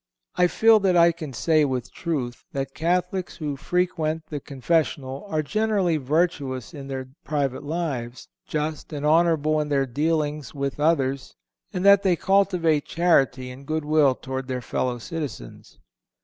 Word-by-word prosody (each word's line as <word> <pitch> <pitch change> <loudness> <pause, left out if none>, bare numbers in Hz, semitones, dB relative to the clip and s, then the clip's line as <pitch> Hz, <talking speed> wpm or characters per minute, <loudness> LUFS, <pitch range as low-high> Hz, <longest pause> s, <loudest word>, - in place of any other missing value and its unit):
I 180 0 +4
feel 225 +4 +5
that 190 -3 +2
I 170 0 +6
can 160 -4 -7
say, 155 +5 +2
with 130 -4 -2
truth, 135 -8 -3
that 135 -1 -3
Catholics 180 +2 -1
who 150 -3 -3
frequent 160 0 -1
the 150 - -3
confessional 140 +2 -1
are 155 -4 0
generally 205 -2 +1
virtuous 140 -3 -1
in 140 -3 -8
their 130 -1 -5
private 140 -4 -1
lives, 145 -6 -4 0.2
just 155 +1 -3
and 145 0 -3
honorable 155 -1 +3
in 150 - -4
their 140 -2 +2
dealings 150 +1 -1
with 140 0 -3
others, 140 -4 0 0.4
and 180 +1 -3
that 200 0 +7
they 190 -3 +3
cultivate 175 -5 +2
charity 135 -7 +2
and 135 +2 -12
good 155 -1 -2
will 150 -3 +4
toward 130 0 -5
their 130 -1 -2
fellow 125 0 -2
citizens. 130 - -7
150 Hz, 150 wpm, -24 LUFS, 135-170 Hz, 0.4 s, that